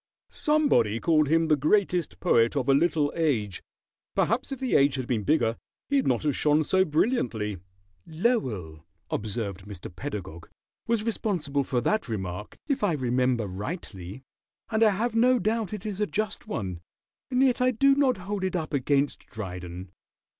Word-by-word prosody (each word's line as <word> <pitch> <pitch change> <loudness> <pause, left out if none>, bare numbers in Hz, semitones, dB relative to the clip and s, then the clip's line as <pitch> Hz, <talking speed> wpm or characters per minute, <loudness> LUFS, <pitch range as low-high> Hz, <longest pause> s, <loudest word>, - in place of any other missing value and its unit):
Somebody 290 - +2
called 155 -1 +3
him 165 +2 +3
the 155 - +4
Greatest 175 +2 +1
Poet 115 +2 +3
of 135 -3 -1
a 135 - +5
Little 150 0 +2
Age. 115 - 0 0.5
Perhaps 235 +5 +1
if 270 - -4
the 260 -2 -2
age 140 0 +4
had 130 -2 -3
been 120 -3 0
bigger 115 -4 +2 0.3
he'd 280 -2 +2
not - - +1
have 150 -2 +1
shone 150 +1 +3
so 190 +5 +3
brilliantly." 125 - 0 0.5
"Lowell," 125 - -1 0.3
observed 100 -3 -4
Mr. 90 -3 -9
Pedagog, 95 - -6 0.4
"was 230 -2 +1
responsible 175 -11 -1
for 125 -2 -1
that 215 - 0
remark, 95 -2 -5
if 280 -7 -1
I 195 -5 +3
remember 125 -3 +1
rightly, 100 - -6 0.5
and 220 0 +1
I 220 - +7
have 220 +4 -1
no 250 +2 +5
doubt 220 -1 -1
it 210 -2 -6
is 205 -2 -4
a 210 - +2
just 215 0 -3
one, 95 - -4 0.5
and 255 0 +2
yet 255 -1 +2
I 250 - +4
do 275 +3 +4
not 275 -4 +2
hold 200 -1 -3
it 185 -1 -1
up 160 -3 -3
against 140 +1 0
Dryden. 90 -3 -7
150 Hz, 165 wpm, -27 LUFS, -, 0.5 s, I